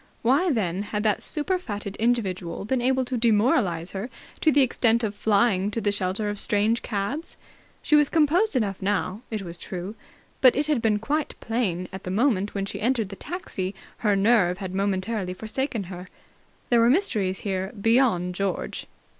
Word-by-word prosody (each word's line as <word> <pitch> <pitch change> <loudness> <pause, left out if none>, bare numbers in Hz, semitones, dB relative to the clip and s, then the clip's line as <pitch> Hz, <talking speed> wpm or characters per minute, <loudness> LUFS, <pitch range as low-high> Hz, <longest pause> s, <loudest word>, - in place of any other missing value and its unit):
Why, 275 +10 +3
then, 195 - 0
had 210 0 -3
that 215 -2 +1
super 365 +5 -1
fatted 205 - -5
individual 200 -7 -1
been 255 +3 0
able 260 +1 +2
to 250 0 -2
demoralize 210 -6 +2
her 200 +5 -5 0.3
to 315 - +4
the 280 -1 +5
extent 235 -2 +2
of 210 -2 -1
flying 205 -2 +2
to 215 - -3
the 210 -2 +1
shelter 200 +1 -1
of 205 -1 -3
strange 215 +3 +1
cabs? 235 - -3 0.5
She 300 - +3
was 295 -1 +5
composed 330 +5 +3
enough 205 -6 0
now, 195 +1 -1
it 215 -3 -3
was 170 -1 -6
true, 185 +2 -6 0.5
but 255 -2 +7
it 290 - +1
had 295 -5 +1
been 215 -2 +2
quite 290 +8 -2
plain 220 -7 -1
that 185 - -12
at 190 - -7
the - - -5
moment 205 -1 +1
when 195 -1 -1
she - - -6
entered 230 -3 +1
the 195 - -7
taxi 195 - -5 0.2
her 210 -3 +2
nerve 195 -3 +3
had 190 -2 -6
momentarily 195 0 -1
forsaken 225 +2 -3
her. 180 0 -9 0.6
There 240 - +5
were 230 +1 +5
mysteries 220 - +1
here, 190 -1 -2
beyond 225 -6 +2
George. 195 0 -3
210 Hz, 180 wpm, -25 LUFS, 190-245 Hz, 0.6 s, but